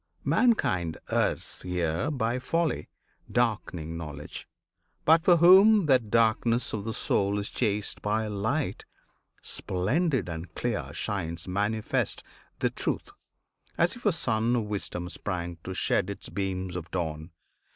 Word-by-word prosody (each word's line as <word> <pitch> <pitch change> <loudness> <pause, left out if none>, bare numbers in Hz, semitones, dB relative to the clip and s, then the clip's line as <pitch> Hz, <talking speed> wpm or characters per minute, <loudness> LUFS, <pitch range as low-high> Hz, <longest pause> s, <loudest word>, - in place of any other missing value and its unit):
Mankind 140 - +2
errs - - 0
here 90 - -1
By 125 -4 0
folly, 160 - -1 0.4
darkening 95 -9 -1
knowledge. 75 -3 -7 0.6
But, 160 +1 +6
for 175 -1 +6
whom 190 +4 +7
That 130 -7 +3
darkness 115 +1 +2
of 105 -2 -3
the 115 - -2
soul 100 -1 +1
is 100 0 -2
chased 105 -3 -1
by 110 +1 0
light, 110 +8 -1 0.6
Splendid 125 - 0
and 85 0 -6
clear 120 -4 -2
shines 85 -5 -3
manifest 105 +3 0 0.3
the - - 0
Truth - - -3 0.7
As 170 +1 +2
if 240 - -13
a - - +6
Sun 115 -6 +1
of 120 - +1
Wisdom 100 -4 -4
sprang 85 -2 -4
to 95 - -5
shed 90 0 +1
Its 100 - -7
beams 95 -1 -3
of 85 -2 -5
dawn. 80 -2 -3
105 Hz, 130 wpm, -28 LUFS, 90-125 Hz, 0.7 s, whom